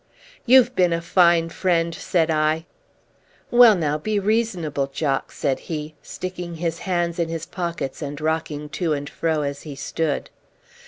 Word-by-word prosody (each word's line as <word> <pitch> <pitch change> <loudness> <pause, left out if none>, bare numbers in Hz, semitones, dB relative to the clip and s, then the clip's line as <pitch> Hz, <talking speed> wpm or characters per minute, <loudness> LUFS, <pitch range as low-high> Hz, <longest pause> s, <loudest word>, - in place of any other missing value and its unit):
"You've 255 0 +6
been 180 -2 +3
a 165 - 0
fine 170 -1 +3
friend!" 170 -1 0
said 165 0 0
I. 155 +1 +1 0.9
"Well 240 -3 +8
now, 155 -4 -1
be 215 +6 -1
reasonable, 195 -9 0
Jock," 135 0 -2
said 135 -2 -1
he, 155 -1 -4
sticking 180 -2 -6
his 165 0 -3
hands 175 -1 0
into 165 -1 -1
his 165 0 -4
pockets 170 -6 -4
and 145 -1 -5
rocking 155 -1 -2
to 165 0 -1
and 145 -1 -3
fro 160 -1 -1
as 140 0 -4
he 150 -3 -8
stood. 150 +1 -2
165 Hz, 155 wpm, -23 LUFS, 150-180 Hz, 0.9 s, Well